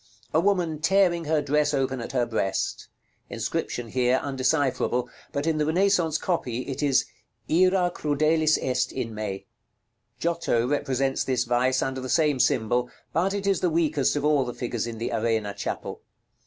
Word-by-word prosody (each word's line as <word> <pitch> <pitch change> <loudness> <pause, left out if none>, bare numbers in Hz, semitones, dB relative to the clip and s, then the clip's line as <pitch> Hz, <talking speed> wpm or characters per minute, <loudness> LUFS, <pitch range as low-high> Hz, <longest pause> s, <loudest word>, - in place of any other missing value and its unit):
A 160 - +4
woman 175 -4 +1
tearing 175 -1 +2
her 155 -1 +1
dress 150 +1 +1
open 130 -2 -1
at - - -6
her 125 -2 +1
breast. 110 -5 -2 0.4
Inscription 120 -2 -3
here 125 +1 +2
undecipherable; 135 -2 0 0.2
but 140 +1 -2
in 160 -1 +1
the 150 - +2
Renaissance 175 -2 +2
copy 130 -11 -2
it 135 +1 -5
is 140 -3 +3 0.4
"IRA 180 +1 +3
CRUDELIS 155 +1 +2
EST 130 -1 -1
IN 120 -4 -4
ME." 105 -3 -5 0.7
Giotto 165 -9 0
represents 135 -1 0
this 125 -2 0
vice 125 +2 +1
under 130 0 -3
the 130 - -6
same 150 -4 +2
symbol; 125 -2 +1 0.2
but 185 +5 +1
it 200 -1 -3
is 195 -3 +2
the 180 - +1
weakest 155 -5 +1
of 145 0 -1
all 150 -2 +3
the 125 -1 -6
figures 120 -2 -3
in 115 -1 -6
the 115 - -3
Arena 110 -2 0
Chapel. - - -5
140 Hz, 165 wpm, -25 LUFS, 125-160 Hz, 0.7 s, A